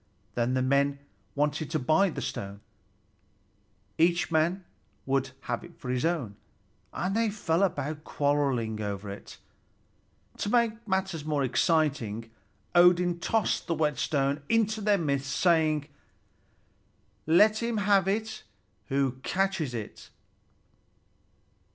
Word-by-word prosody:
Then 120 +2 0
the 130 - +1
men 140 +1 +2 0.4
wanted 150 +1 0
to 155 - 0
buy 155 +9 +3
the - - -5
stone; 100 +1 -5 1.4
each 170 +1 +3
man 170 +4 +1 0.4
would 135 0 0
have 120 -1 -3
it 175 -1 -14
for 145 -7 -8
his 125 -1 -1
own, 145 -12 -1 0.5
and 185 +3 -2
they 225 -1 +2
fell 175 -5 -1
to 155 -1 -4
quarreling 135 -8 0
over 100 -1 -4
it. 100 - -10 1.0
To 205 - -2
make 230 -1 +1
matters 190 -5 -1
more 150 -2 0
exciting, 130 -6 0 0.4
Odin 175 0 +5
tossed 220 +3 0
the 165 - 0
whetstone 145 -1 0
into 220 -1 +2
their 205 -1 +3
midst, 140 -5 -1
saying: 155 -4 +2 1.4
"Let 210 +7 +5
him 235 -1 -1
have 200 -2 +3
it 220 +2 -2 0.5
who 135 -1 0
catches 180 -7 -1
it!" 110 -3 -7
155 Hz, 120 wpm, -28 LUFS, 135-190 Hz, 1.4 s, Odin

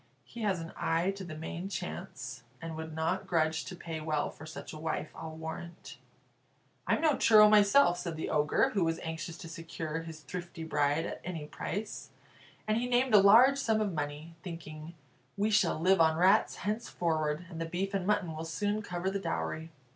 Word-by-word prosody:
He 235 - -10
has 200 -4 +1
an 165 0 -7
eye 165 +4 +1
to 195 0 -7
the 170 -4 -7
main 170 +4 -5
chance, 135 -10 -6 0.2
and 165 -1 -6
would 160 0 -6
not 165 +4 -1
grudge 160 -2 +1
to 185 - -7
pay 165 -2 -6
well 155 -1 -1
for 155 - -11
such 160 - -8
a 155 - -8
wife, 155 -1 -3
I'll 160 -1 -7
warrant." 160 +1 -7 0.9
"I'm - - +2
no 310 -3 +4
churl 215 -1 +7
myself," 205 -2 +5
said 170 -2 -4
the 160 - -3
Ogre, 150 0 +2
who 200 -4 +1
was 165 0 0
anxious 160 +1 -5
to 175 - -9
secure 160 -1 -5
his 160 -1 -9
thrifty 175 +2 -7
bride 150 0 +1
at - - -6
any 165 -4 -5
price; 205 +7 -5 0.6
and 215 0 +2
he 245 - -1
named 250 0 +2
a 210 - +10
large 240 +8 +7
sum 220 -4 +2
of 205 -3 0
money, 150 +2 -4
thinking, 165 -2 -8 0.4
"We 210 +2 +1
shall 200 -6 +3
live 185 +1 +4
on 160 -1 +4
rats 190 +5 +4
henceforward, 170 -7 -1
and 165 -3 -7
the - - -1
beef 185 +4 -2
and 195 -2 -1
mutton 190 -6 +1
will 160 +1 -5
soon 205 +5 -1
cover 180 -1 -3
the 200 - -2
dowry." 85 - -3
170 Hz, 190 wpm, -31 LUFS, 160-195 Hz, 0.9 s, a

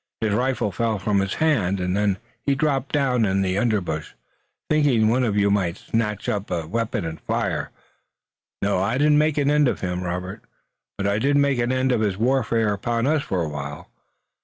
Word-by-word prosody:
His 110 -2 0
rifle 125 -2 0
fell 110 +3 -1
from 100 +1 +1
his 95 0 -1
hand, 105 - +1
and 90 +1 -1
then 100 -2 +1 0.3
he 140 - +1
dropped 135 -2 0
down 130 -5 +2
in 95 -1 +1
the 95 +1 0
underbrush, 100 -9 -1 0.5
thinking 145 -8 +3
one 125 +3 +2
of 105 -4 0
you 100 0 +3
might 95 -3 0
snatch 105 -2 -2
up 100 0 -2
a 85 -2 -2
weapon 110 +1 -2
and 80 0 -6
fire. - - -2 0.9
No, 100 -2 +1
I 115 +6 0
didn't 150 +1 +4
make 155 -1 +1
an 145 0 +2
end 150 -1 +4
of - - -1
him, 90 -1 -2
Robert, 90 +1 -4 0.6
but 100 - -2
I 100 +1 +1
did 140 +4 +2
make 140 -3 +2
an 120 +1 +1
end 130 0 +1
of 120 -3 +1
his 100 -3 0
warfare 115 -2 +1
upon 115 +3 -1
us 150 +1 +2
for 90 -8 -2
a 80 - -3
while. 75 -1 -7
110 Hz, 200 wpm, -23 LUFS, 95-130 Hz, 0.9 s, didn't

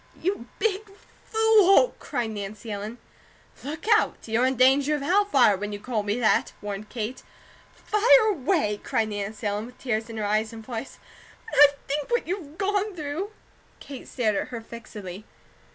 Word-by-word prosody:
"You 350 -9 -2
big 430 -1 -1 0.4
fool!" 445 +1 +5
cried 235 -2 -3
Nancy 210 +1 -6
Ellen. 210 +3 -5 0.7
"Look 305 +6 -6
out! 430 - +1
You're 230 +3 +2
'in 265 - 0
danger 270 +4 +4
of 290 - -4
Hell 390 +7 +3
fire,' 260 - +4
when 205 +2 -4
you 205 - -5
call 220 0 -2
me 205 +3 -2
that!" 225 - +2
warned 205 0 -6
Kate. 235 +1 -5 0.5
"Fire 440 +1 +4
away!" 285 - 0
cried 220 -1 0
Nancy 210 +1 -5
Ellen, 205 +2 -1
with 250 - -15
tears 225 -2 -2
in 225 - -7
her 215 - -2
eyes 215 +2 0
and 225 -1 -10
voice. 240 +1 -6 0.5
"When - - 0
I 295 - +12 0.2
think 290 +1 -2
what 475 -1 +1
you've 335 -4 -5
gone 405 0 0
through 310 +5 -4 0.3
" - - -33
Kate 275 -3 -10
stared 220 -5 0
at - - -1
her 240 - -6
fixedly. 215 -4 -9
245 Hz, 175 wpm, -25 LUFS, 215-350 Hz, 0.7 s, I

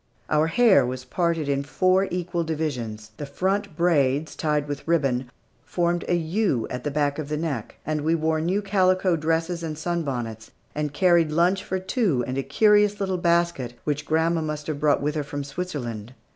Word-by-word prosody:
Our 155 +1 +3
hair 190 - +5
was 125 +1 -4
parted 165 +1 0
in 140 -1 +1
four 185 +6 +2
equal 175 -1 -2
divisions; 125 -10 -4
the 145 - -5
front 190 +3 -1
braids, 150 -4 +2
tied 150 -2 0
with 145 +1 -6
ribbon, 135 -7 +1 0.3
formed 175 +3 -1
a 175 - +2
U 170 - 0
at 125 0 -4
the 145 - -1
back 145 0 0
of 150 -2 -5
the 150 - -1
neck; 150 -9 -3
and 155 0 -1
we 160 +3 +2
wore 160 -1 0
new 190 +5 0
calico 185 -2 +2
dresses 165 +2 -1
and 155 -2 -4
sun 170 +2 -1
bonnets, 115 -6 -4 0.2
and 150 -1 -2
carried 170 0 +3
lunch 175 +5 +2
for 190 - -2
two 185 - 0
in 130 - -4
a 135 - 0
curious 205 +8 +3
little 190 -2 -1
basket, 170 -8 +1
which 150 0 -2
grandma 160 +1 +2
must 150 -1 -4
have 155 -2 -3
brought 145 -1 +2
with 150 +1 0
her 150 -1 -2
from 145 0 -5
Switzerland. 130 - -5
155 Hz, 185 wpm, -24 LUFS, 140-175 Hz, 0.3 s, hair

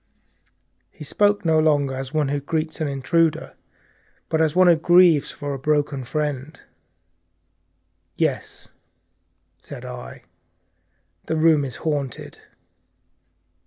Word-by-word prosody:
He - - -12
spoke 205 +6 +1
no 160 -1 +3
longer 145 -3 +2
as 130 0 -6
one 150 -3 0
who 145 +1 -1
greets 155 +3 -3
an 155 - 0
intruder, 150 +4 0 0.8
but 160 - +1
as 160 0 +1
one 185 0 +5
who 175 -1 +6
condoles 175 -2 +4
with 140 -2 -5
a 145 -2 0
friend. 150 0 -3 1.6
"Yes," - - -3 0.9
said 130 +2 -10
I, 125 -1 -9 1.0
"the 160 - -1
room 155 -2 +4
is 130 -4 -5
haunted." 145 -5 -4
150 Hz, 110 wpm, -22 LUFS, 140-160 Hz, 1.6 s, who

